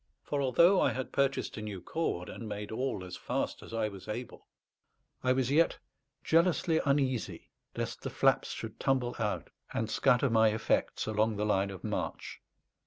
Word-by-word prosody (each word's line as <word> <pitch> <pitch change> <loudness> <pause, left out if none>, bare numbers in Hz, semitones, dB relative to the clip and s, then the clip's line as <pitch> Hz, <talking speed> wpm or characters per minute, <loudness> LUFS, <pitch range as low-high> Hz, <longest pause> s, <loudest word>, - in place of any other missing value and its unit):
For 145 -1 -1
although 170 +8 +5
I - - +3
had 130 0 -4
purchased 140 -3 0
a - - -4
new 105 -3 -5
cord, 90 - -2
and 115 -2 -7
made 105 0 -5
all 110 -4 -2
as 90 - -7
fast - - -3
as - - -11
I 115 -1 0
was 100 -3 -9
able, 120 +3 -6 0.8
I 130 - +3
was 130 0 +1
yet 165 +3 +3 0.5
jealously 165 0 +3
uneasy 135 -4 0 0.2
lest - - -4
the - - -4
flaps - - +2
should - - -6
tumble 130 -2 +1
out 105 -2 -2 0.2
and 110 -1 -1
scatter 130 0 +3
my 110 -1 +5
effects 110 +1 0
along 110 0 +1
the 105 +1 -1
line 100 -2 +2
of 95 -2 -8
march. - - -4
120 Hz, 175 wpm, -31 LUFS, 105-140 Hz, 0.8 s, although